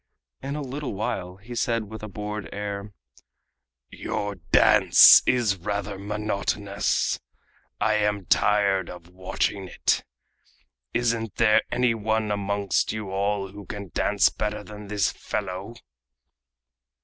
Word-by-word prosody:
In 140 +2 -4
a 150 - -3
little 135 -3 -5
while 95 -4 -3
he 105 +6 -11
said 115 -1 0
with 110 - -8
a 110 - -6
bored 105 0 -6
air: 100 0 -5 1.0
"Your 105 0 -3 0.2
dance - - +8
is 115 -6 +2
rather 100 +1 -4
monotonous. 100 -1 -1 0.6
I 110 -1 +2
am 105 -2 0
tired 100 -1 +2
of 90 -1 -11
watching 95 +1 -2
it. - - 0 0.9
Isn't 115 -3 -1
there 110 -2 +4
any 125 -1 +2
one 110 -1 -1
amongst 100 -1 0
you 105 -2 -5
all 100 0 -1
who 100 +1 -11
can 100 -2 -7
dance - - +3
better 105 0 -4
than 105 0 -10
this 105 -1 +1
fellow?" 100 +1 -5
105 Hz, 125 wpm, -25 LUFS, 100-110 Hz, 1.0 s, dance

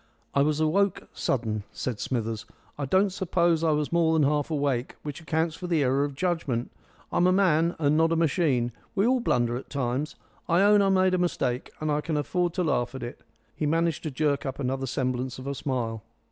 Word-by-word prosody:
"I 140 - +3
was 150 +1 +2
awoke 180 +5 +1
sudden," 110 -4 -1
said 125 -5 -4
Smithers. 115 -3 -3 0.3
"I 145 - -3
don't 190 +8 +3
suppose 175 -3 +1
I 165 - +3
was 150 -1 0
more 170 -1 +3
than 155 -3 +4
half 145 0 0
awake, 140 -5 -1
which 150 +2 -6
accounts 160 0 0
for 180 +2 -6
the 165 -4 +2
error 135 +2 +2
of 145 -1 -3
judgment. 165 -8 -1 0.4
I'm 175 - +3
a - - +4
man, 170 -3 +3
and 150 -1 +2
not 165 +1 +3
a - - +3
machine. 150 -7 +1 0.2
We 200 +1 +3
all 255 +2 +3
blunder 120 - +1
at 130 - -9
times. 135 +2 -2 0.3
I 175 +3 +4
own 205 0 +6
I 195 - +3
made 185 -1 +3
a 185 - +2
mistake, 130 -8 -1
and 155 0 -1
I 150 0 +1
can 155 -1 -2
afford 175 +4 0
to 180 - +1
laugh 125 -5 0
at 130 - -6
it." 120 - -7 0.3
He 150 - -1
managed 165 +1 +1
to 155 - -3
jerk 145 +1 0
up 135 -2 -4
another 135 0 -2
semblance 130 -1 -2
of 130 - -9
a 140 - -2
smile. 120 -5 -3
150 Hz, 215 wpm, -27 LUFS, 130-170 Hz, 0.4 s, own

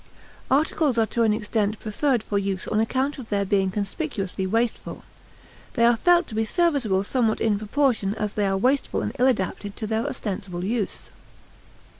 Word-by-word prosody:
Articles 290 -1 +2
are 225 - +4
to 235 - -2
an 225 -2 +4
extent 210 0 -1
preferred 235 +2 0
for 205 -2 -1
use 195 -2 -2
on 215 - +1
account 265 +6 0
of 240 - -9
their 200 -1 0
being 195 -1 +2
conspicuously 195 - -3
wasteful; 230 +4 -2 0.7
they 235 - +4
are 240 0 +5
felt 350 +8 +4
to - - -11
be 220 +1 +1
serviceable 250 - +1
somewhat 225 0 0
in 210 -3 +1
proportion 220 -3 +1
as 210 -2 -3
they 205 -2 0
are 195 0 +1
wasteful 260 +7 +1
and - - -4
ill 255 - +5
adapted 205 -3 -1
to 220 - -4
their 220 +4 -1
ostensible 195 -9 -4
use. 215 +1 -3
220 Hz, 175 wpm, -24 LUFS, 200-255 Hz, 0.7 s, are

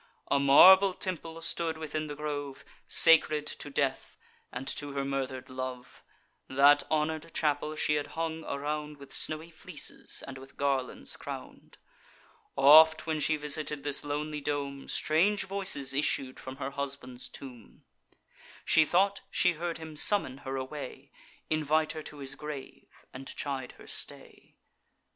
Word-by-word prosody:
A 140 - +4
marble 185 +8 +8
temple 165 -3 -5
stood 165 -1 -1
within 155 0 -4
the 145 - -6
grove, 145 -2 -5 0.2
Sacred 155 -2 +5
to 150 - -5
death, 140 -1 -2 0.3
and 125 +2 -6
to 145 -1 -4
her 140 0 -2
murder'd 135 -2 -3
love; 130 -1 -7 0.5
That 140 +2 +5
honour'd 155 +1 -1
chapel 150 0 0
she 150 - +1
had 145 -1 -1
hung 160 -1 -2
around 150 +1 -4
With 140 -1 -11
snowy 155 +2 -2
fleeces, 165 -1 -3
and 135 -1 -8
with 135 +1 -15
garlands 135 -2 -1
crown'd: - - -9 0.8
Oft, 155 +3 +7
when 160 -1 -1
she 155 +1 +2
visited 150 0 0
this 145 0 0
lonely 150 +1 -3
dome, 140 -1 -3
Strange 190 +7 +2
voices 190 -9 -2
issued 135 -2 0
from 130 0 -8
her 135 0 -5
husband's 135 -3 -5
tomb; 125 -5 -12 0.8
She 155 - +5
thought 195 +5 +2
she 180 - +3
heard 170 +1 -4
him 160 -1 -9
summon 150 -6 +1
her 135 -1 -5
away, 135 0 -7 0.4
Invite 155 0 +1
her 155 - -6
to 150 - -8
his 135 -1 -4
grave, 150 -2 -9
and 135 +1 -9
chide 135 -3 -4
her - - -15
stay. - - -6
145 Hz, 145 wpm, -30 LUFS, 140-160 Hz, 0.8 s, marble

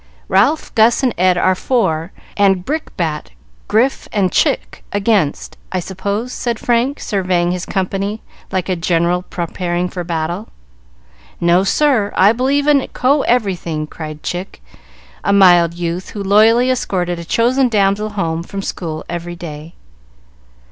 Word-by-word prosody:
"Ralph, 310 - +2
Gus, 230 +3 +4
and 250 - +2
Ed 180 0 +3
are 185 +1 +3
for, 185 -6 0 0.2
and 195 -3 +2
Brickbat, 170 - -3 0.3
Grif, 230 +6 +1
and 195 -4 +1
Chick - - 0
against, 200 -6 0
I 185 - -1
suppose?" 200 +7 -4
said 235 -2 -2
Frank, 250 +3 0
surveying 180 -4 0
his 180 0 -4
company 195 +3 -2 0.3
like 185 -2 -1
a 185 - 0
general 170 +1 +1
preparing 175 0 -3
for 180 -1 -5
battle. 170 +4 -3 0.9
"No, 170 +2 +3
sir! 225 -1 +2
I 195 +3 +6
believe 270 +4 +1
in 290 -3 +3
co 275 +3 +2
everything!" 180 -11 0
cried 155 -1 -8
Chick, 180 +2 -5 0.6
a - - +1
mild 175 -4 +5
youth, 175 +1 -4
who 205 - -5
loyally 225 +5 +4
escorted 180 -8 -1
a - - -6
chosen 245 +8 +2
damsel 205 0 +1
home 170 -6 -2
from 195 +3 -6
school 160 -5 -5
every 175 0 -5
day. 160 -1 -9
190 Hz, 140 wpm, -17 LUFS, 175-225 Hz, 0.9 s, I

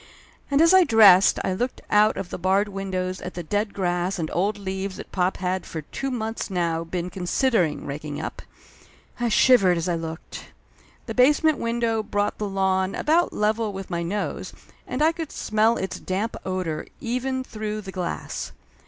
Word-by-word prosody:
And 280 +1 +3
as 335 +2 +6
I 375 -1 +8
dressed 210 - +7
I 190 - 0
looked 245 +7 -2
out 210 0 +4
of 190 -3 -5
the - - -5
barred 190 +3 +2
window 190 -2 -3
at 180 - -6
the 175 - -4
dead 205 +5 -1
grass 180 0 -1
and 160 -3 -3
old 205 +4 0
leaves 190 -1 -4
that - - -9
pop 185 0 0
had 185 0 -1
for 160 -2 -6
two 270 - -4
months 225 -4 -3
now 170 -3 -1
been 175 +1 -4
con 180 -2 -6
sidering 185 - +1
raking 145 +1 -5
up. - - -5 0.8
I 240 -1 +1
shivered 215 -6 +5
as 170 +1 -2
I 175 - +1
looked. 165 0 -6 0.6
The - - -5
base 265 +5 +4
ment 315 -2 +3
window 230 -1 0
brought 205 -1 -2
the 210 -1 -2
lawn 190 -1 +1
about 335 +3 +2
level 215 +1 0
with 195 -1 -7
my 170 0 -1
nose 195 +5 -3 0.3
and 270 - -1
I 320 - +5
could 325 -2 -6
smell 220 +2 +1
its 190 -1 -4
damp 200 +5 -2
odor 180 -5 -3
even 260 +1 -2
through 215 -3 -5
the 195 -2 -8
glass. 180 -2 -4
195 Hz, 185 wpm, -24 LUFS, 180-225 Hz, 0.8 s, I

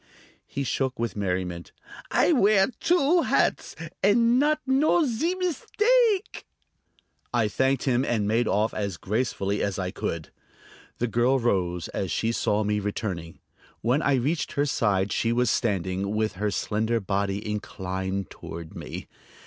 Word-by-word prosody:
He 140 - -3
shook 130 0 -1
with 115 -4 -2
merriment. 90 -3 -3 0.4
"I - - +3
wear 205 -5 +4
two 340 0 +3
hats - - +1 0.3
and 230 +5 +4
not 300 +2 +2
know 295 +5 +3
zee 300 +9 0
meestake!" 420 - +1 0.8
I 120 -3 +2
thanked 130 +5 +1
him 130 -1 +2
and 110 -6 0
made 115 +3 +2
off 105 +2 +1
as 100 -5 -3
gracefully 105 0 -1
as 100 -2 -1
I 90 -1 -2
could. 85 -3 -4 0.7
The 120 - 0
girl 120 +3 +2
rose 90 -8 0
as 95 - -3
she 115 +7 0
saw 105 -2 +1
me 105 0 0
returning. 95 -5 -4 0.4
When 125 +7 +2
I 140 - +3
reached 145 +6 -1
her 145 - +1
side 100 -7 +1
she 115 - +1
was 125 +1 +2
standing 100 -2 -1
with 110 0 +1
her 105 +3 -1
slender 110 +3 0
body 100 +1 -2
inclined 95 -2 -4
toward 85 -1 -9
me. - - -7
110 Hz, 145 wpm, -26 LUFS, 100-145 Hz, 0.8 s, wear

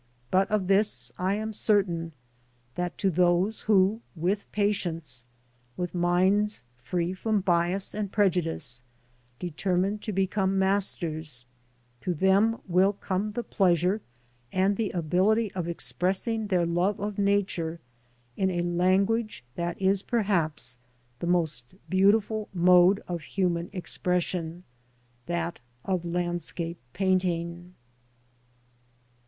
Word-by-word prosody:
But 190 +1 +3
of 210 -3 +1
this 200 +3 +2
I 185 +2 +1
am 220 +1 -3
certain, 180 -6 +1 0.6
that 180 +3 -3
to 195 - +1
those 180 +5 +2
who 210 +1 +3
with 185 +5 -1
patience, 170 - -1 0.5
with 180 -1 -3
minds 185 +2 +2
free 170 +8 -2
from 210 +2 0
bias 180 +1 +1
and 205 -2 -3
prejudice, 165 - 0 0.6
determine 180 +5 -1
to 215 - -4
become 195 0 0
masters, 165 -8 0 0.5
to 180 +5 -2
them 195 +7 +3
will 185 +3 +3
come 195 +1 -2
the 235 +3 -4
pleasure 185 +1 +2 0.5
and 190 +2 +2
the 215 -1 -1
ability 190 +6 +1
of 180 -3 -3
express 180 +3 0
ing 225 -2 -1
their 180 -3 +2
love 175 +4 0
of 205 0 -3
Nature 195 -5 0 0.6
in 190 -1 +1
a 175 -2 -1
language 190 - +1
that 170 +3 -3
is 195 0 +2
perhaps 170 - 0 0.4
the 175 - -3
most 160 -6 -1 0.2
beautiful 205 +3 +3
mode 180 +3 +5
of 175 -2 -3
human 175 0 -1
expression 180 -2 -2 0.3
— 120 0 -38
that 170 0 -2 0.3
of 185 -3 0
landscape 175 -1 -3
painting. 180 -1 -1
185 Hz, 115 wpm, -27 LUFS, 170-200 Hz, 0.6 s, mode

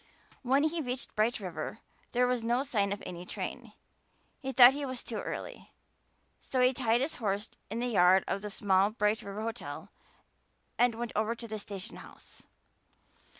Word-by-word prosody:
When 270 +3 +3
he 320 +1 0
reached 255 -1 -5
Bright 225 +3 +2
River 180 0 -5 0.3
there 250 +1 +3
was 250 -1 +1
no 240 +3 +1
sign 210 -8 0
of 200 - -4
any 175 -1 -6
train; - - -6 0.7
he 265 -1 -4
thought 255 -1 +9
he 290 +1 -4
was 260 -2 -4
too - - -5
early, - - -6 0.7
so 260 - -2
he 250 +1 +5
tied 240 -2 +2
his 290 +4 -1
horse 205 0 -1 0.2
in 220 - -4
the 240 - -1
yard 190 -5 +5
of 195 - -1
the 210 - -4
small 195 -1 +3
Bright 215 0 +1
River 200 +2 -6
hotel 230 +1 -5 0.9
and 245 -1 +3
went 235 0 -4
over 220 +2 +1
to 230 0 -8
the 215 -1 -4
station 200 -2 -7
house. - - -13
230 Hz, 175 wpm, -31 LUFS, 205-250 Hz, 0.9 s, thought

